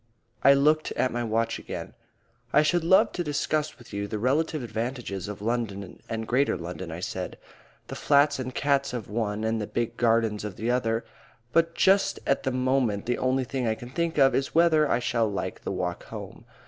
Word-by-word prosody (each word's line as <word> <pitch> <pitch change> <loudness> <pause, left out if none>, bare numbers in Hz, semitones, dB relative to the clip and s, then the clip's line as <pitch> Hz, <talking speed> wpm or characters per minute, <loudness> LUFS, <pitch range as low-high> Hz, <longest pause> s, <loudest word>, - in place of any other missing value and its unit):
I 140 - +8
looked 155 +3 +3
at 130 - 0
my 120 0 -2
watch 115 0 0
again. - - -7 0.6
"I 150 - +5
should 175 +2 +2
love 190 +3 +5
to 175 - -3
discuss 150 0 -1
with 120 -4 -15
you 100 0 -2
the 105 - -3
relative 145 +5 0
advantages 115 -5 -4
of 105 0 -7
London 110 -4 -3
and 110 -1 -3
Greater 130 -3 +2
London," 85 +1 -6
I 80 +2 -6
said; - - -4 0.5
"the - - -8
flats 145 -1 +3
and 130 -1 -5
cats 140 -1 +1
of 115 -5 -5
one 105 -1 -1
and 110 0 0
the 105 - -3
big 120 0 -2
gardens 115 -3 +2
of 105 -3 -5
the 115 +4 -1
other. 115 -2 0 0.5
But 165 0 +2
just 195 +1 +3
at 135 - +2
the 130 - -1
moment 125 -5 +1
the 120 0 -1
only 130 +1 +1
thing 130 -1 -2
I 110 - +1
can 120 +2 -10
think 170 +3 -1
of 135 -2 +5
is 135 - -1
whether 160 -3 +4
I - - +3
shall 115 -3 0
like 100 - -4
the - - -4
walk - - -3
home. - - -9
125 Hz, 200 wpm, -27 LUFS, 110-140 Hz, 0.6 s, I